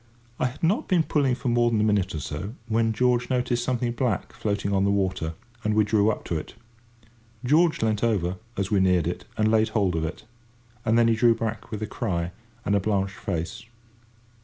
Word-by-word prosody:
I - - +2
had 125 +6 -10
not 205 - +2
been 175 -3 +3
pulling 140 -5 +1
for 125 - -5
more 120 0 +3
than 115 -2 +1
a - - +3
minute 100 -5 +1
or - - -2
so, 100 - -5
when 115 0 +2
George 125 +2 +1
noticed 125 -1 0
something 120 -1 0
black 120 -5 -1
floating 105 -3 -2
on 95 0 +2
the 100 - +2
water, 95 -5 0 0.3
and 105 0 +1
we 110 - +5
drew 105 0 +3
up 110 - -3
to 80 - -1
it. 75 - -10 0.9
George 155 +1 +3
leant 110 -1 0
over, 95 -6 +1 0.2
as 100 0 -1
we 100 - +4
neared 90 -3 +3
it, - - -3
and 110 0 +3
laid 110 0 +3
hold 100 -5 +1
of 80 - -1
it. 80 +2 -5 0.6
And 115 0 +3
then 120 -1 +5
he 115 - +4
drew 115 +1 +4
back 110 0 -4
with 110 -1 -4
a - - 0
cry, 90 -6 -2 0.3
and 100 - +1
a - - +4
blanched 100 -1 0
face. 90 +9 -4
110 Hz, 210 wpm, -25 LUFS, 100-120 Hz, 0.9 s, we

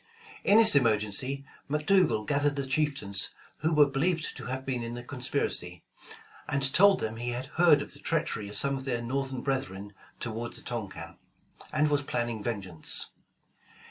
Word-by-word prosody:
In 205 - +5
this 225 -8 +6
emer 115 -6 +5
gency, 130 +7 -3 0.3
McDougal 150 - +2
gathered 145 0 +1
the 140 -1 -2
chieftains 130 -8 0 0.3
who 160 +2 +1
were 150 -2 +6
be 135 -1 -3
lieved 165 +1 0
to - - -8
have 130 +2 -4
been 125 -3 -2
in 115 0 -5
the 120 - -7
conspiracy, 125 - -2 0.7
and 135 -1 +1
told 200 +1 +6
them 110 0 -3
he 120 +1 -3
had 120 +2 -3 0.2
heard 170 -4 +6
of - - -9
the - - -9
treachery 100 - -2
of 105 - -4
some 140 0 +3
of 135 -1 -6
their 120 -3 -2
Northern 130 +1 -3
brethren 105 -8 -3 0.3
toward 115 0 -4
the - - -5
Tonquin, 115 -6 -6 0.5
and 150 0 +2
was 145 -1 +2
planning 120 -5 -2
ven 110 -2 -2
geance. 85 -4 +1
130 Hz, 175 wpm, -29 LUFS, 115-145 Hz, 0.7 s, this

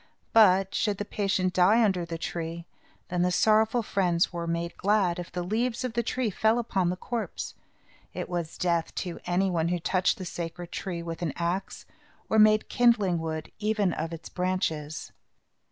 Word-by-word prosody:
But, 195 -3 +5
should 205 -2 0
the 205 - -3
patient 195 -3 0
die 205 +6 +5
under 190 -5 +1
the 165 0 -5
tree, 165 0 -5 0.4
then 180 0 0
the 180 - +3
sorrowful 220 +4 +3
friends 180 -4 +1
were 170 -1 -3
made 170 0 -2
glad, 195 -3 +1
if 175 - -7
the 180 - -3
leaves 235 +6 -1
of 250 -3 -3
the 235 - +1
tree 235 0 -1
fell 220 +4 +2
upon 195 -7 0
the 180 - -1
corpse. 230 +4 -4 0.6
It - - -5
was 175 -3 -4
death 170 -2 0
to 175 - -6
any 185 +2 +1
person 165 -2 +1
who 175 +1 0
touched 180 +2 +1
the 185 - -6
sacred 170 0 -6
tree 175 -3 -4
with 165 0 -6
an 165 -5 -1
axe, 175 +3 -3 0.4
or 220 - +3
made 215 0 +5
kindling 210 -8 +3
wood, 160 -1 -4
even 210 -4 +1
of 165 - -3
its 165 0 -7
branches. 160 -5 -2
180 Hz, 180 wpm, -27 LUFS, 170-215 Hz, 0.6 s, But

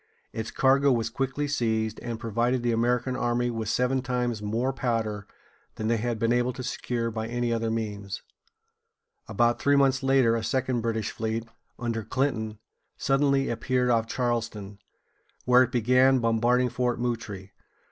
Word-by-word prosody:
Its 110 0 -4
cargo 135 +1 +3
was 115 -2 0
quickly 135 +3 -2
seized, 110 -5 -1
and 115 -2 -5
provided 120 +2 0
the 120 - +1
American 125 +2 +1
army 120 -1 0
with 110 -2 -3
seven 125 +3 +1
times 125 -3 -2
more 115 +6 -1
powder 110 -5 -2 0.5
than 110 0 -2
they 115 - +2
had 120 +1 -2
been 115 +2 +1
able 120 +1 +1
to 130 +1 -7
secure 115 -2 -2
by 110 0 -4
any 120 0 -1
other 115 0 -1
means. 105 -3 -4 1.0
About 120 -1 +1
three 140 0 +4
months 135 -1 +3
later 135 -4 +3
a 115 - -2
second 130 -1 0
British 110 -2 -2
fleet, 110 +1 -3 0.3
under 115 -2 -2
Clinton, 110 -4 -1 0.4
suddenly 135 0 +2
appeared 125 +2 0
off 115 -1 +2
Charleston, 115 -5 -3 0.7
where 125 0 +6
it 130 -1 +2
began 125 +2 +4
bombarding 120 +2 +2
Fort 125 0 -1
Moultrie 105 -5 -4
(moo´trī). - - -38
120 Hz, 155 wpm, -27 LUFS, 115-125 Hz, 1.0 s, where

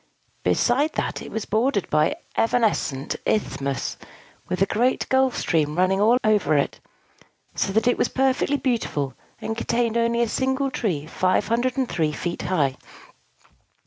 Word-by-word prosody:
Besides 280 +6 +2
that, - - -2
it - - -8
was 220 - -4
bordered 220 -1 +1
by 155 - +3 0.2
evanescent 220 - 0
isthmuses, 140 -8 -1 0.5
with 180 - -2
a 195 - +4
great 240 +6 +1
gulf 265 -1 +2
stream 155 -1 0
running 185 +1 +2
about 225 +4 +5
all 215 - +4
over 200 -8 +2
it; 140 - -1 0.7
so - - -1
that 220 +3 +1
it 245 - +2
was - - +3
perfectly 265 +2 +1
beautiful, 185 - -1 0.3
and 220 - -3
contained 235 0 0
only 235 0 +2
a - - 0
single 265 +3 0
tree, 170 - -2
503 210 - 0
feet 170 +3 -4
high. 145 -8 0
220 Hz, 145 wpm, -23 LUFS, 170-245 Hz, 0.7 s, about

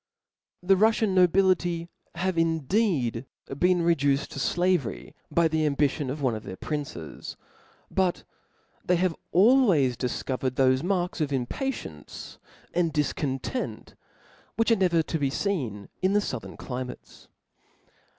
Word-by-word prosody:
The 195 +2 +5
Ruffian 220 0 +3
nobility 180 -2 +3 0.3
have 185 +1 -1
indeed 160 - +1 0.3
been 180 -1 +3
reduced 145 -4 +2
to - - -6
flavery 180 +5 0 0.2
by 170 -1 +3
the 160 0 0
ambition 145 -1 0
of 145 +2 -4
one 125 -3 +2
of 110 - -4
their 95 -3 -7
princes; 140 - -6 0.5
but 185 -2 0 0.6
they 180 - +2
have 175 -1 +1 0.2
always 190 - +5
difcovered 130 +1 -2
thofe 130 -1 +3
marks 180 -1 -1
of 145 -2 0
impatience 130 - -5 0.3
and 170 -2 +1
difcontent, 150 - -2 0.6
which 230 +1 +2
arc 225 - +4
never 170 -3 +3
to 160 - -3
be 140 -2 +1
feen 130 - -2
in 190 +1 +2
the 205 - +4
fouthern 130 - -5
climates. 125 -1 -7
165 Hz, 125 wpm, -27 LUFS, 135-185 Hz, 0.6 s, The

